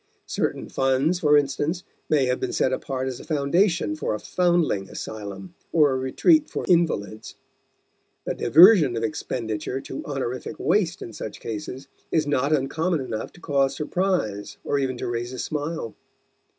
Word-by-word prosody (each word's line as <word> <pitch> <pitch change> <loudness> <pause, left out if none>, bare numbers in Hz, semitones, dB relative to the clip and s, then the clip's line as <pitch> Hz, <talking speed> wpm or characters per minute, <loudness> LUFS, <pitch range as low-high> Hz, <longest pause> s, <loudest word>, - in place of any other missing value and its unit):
Certain - - -2
funds, 135 +6 +1
for 150 -2 +5
instance, 145 +5 0 0.3
may 145 -4 +3
have 125 0 0
been - - -2
set 130 - +1
apart 130 0 -3
as 130 -2 -4
a - - -10
foundation 155 +2 +1
for 155 - -2
a - - -5
foundling 170 - +1
asylum 100 -4 -7 0.2
or 150 -4 +4
a - - 0
retreat 290 - +3
for - - -4
invalids. 130 - 0 0.9
The - - -1
diversion 165 - +6
of 115 - -2
expenditure 115 +2 -3
to 135 - -7
honorific 135 +1 -4
waste 190 -2 +1
in 115 - -9
such 105 - -7
cases 125 +5 -6 0.2
is 155 -2 +1
not 145 0 +1
uncommon 155 +4 +1
enough 115 -5 -4
to 175 - -17
cause 140 -3 +1
surprise 155 - -1
or 145 - 0
even 130 -2 -1
to - - -4
raise 120 +1 -3
a - - -6
smile. 150 -4 -3
140 Hz, 160 wpm, -24 LUFS, 120-160 Hz, 0.9 s, diversion